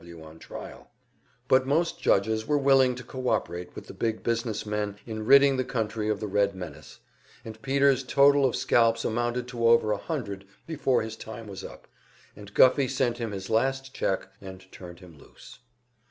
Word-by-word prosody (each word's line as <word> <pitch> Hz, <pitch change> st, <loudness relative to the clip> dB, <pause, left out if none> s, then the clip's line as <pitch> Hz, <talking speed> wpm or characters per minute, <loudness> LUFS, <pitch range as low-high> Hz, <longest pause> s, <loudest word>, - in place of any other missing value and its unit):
W. 85 Hz, -2 st, -12 dB
on 80 Hz, +1 st, -14 dB
trial. -, -, -10 dB, 0.6 s
But 130 Hz, 0 st, +3 dB
most 165 Hz, +5 st, 0 dB
judges 110 Hz, +2 st, +1 dB
were 150 Hz, -, +2 dB
willing 135 Hz, -2 st, +4 dB
to 125 Hz, -, -9 dB
co 130 Hz, +1 st, -4 dB
operate 90 Hz, +1 st, -3 dB
with -, -, -9 dB
the -, -, -11 dB
big 110 Hz, -1 st, -3 dB
business 115 Hz, -2 st, -2 dB
men 105 Hz, -1 st, -3 dB
in 110 Hz, -1 st, -6 dB
ridding 140 Hz, 0 st, +6 dB
the 130 Hz, -, 0 dB
country 110 Hz, -3 st, -3 dB
of 105 Hz, -2 st, -1 dB
the 110 Hz, -, -4 dB
Red 100 Hz, -1 st, 0 dB
menace, 90 Hz, -3 st, -10 dB, 0.4 s
and 110 Hz, -1 st, -10 dB
Peter's 135 Hz, -1 st, +2 dB
total 140 Hz, +2 st, +4 dB
of 130 Hz, -3 st, +2 dB
scalps 115 Hz, -1 st, +2 dB
amounted 120 Hz, +2 st, -1 dB
to 120 Hz, -2 st, 0 dB
over 115 Hz, -2 st, +4 dB
a 105 Hz, -, 0 dB
hundred 100 Hz, -, -5 dB, 0.2 s
before 135 Hz, -7 st, 0 dB
his 110 Hz, 0 st, -6 dB
time 110 Hz, +1 st, -9 dB
was 100 Hz, -2 st, -9 dB
up, -, -, -11 dB, 0.5 s
and 100 Hz, -1 st, -13 dB
Guffey 130 Hz, +1 st, +5 dB
sent 130 Hz, -3 st, -1 dB
him 115 Hz, -2 st, -3 dB
his 95 Hz, -1 st, -6 dB
last 135 Hz, +3 st, 0 dB
cheek 95 Hz, -, -1 dB, 0.2 s
and 95 Hz, -1 st, -10 dB
turned 90 Hz, 0 st, -12 dB
him 85 Hz, -5 st, -15 dB
loose. -, -, -16 dB
115 Hz, 185 wpm, -27 LUFS, 100-130 Hz, 0.6 s, ridding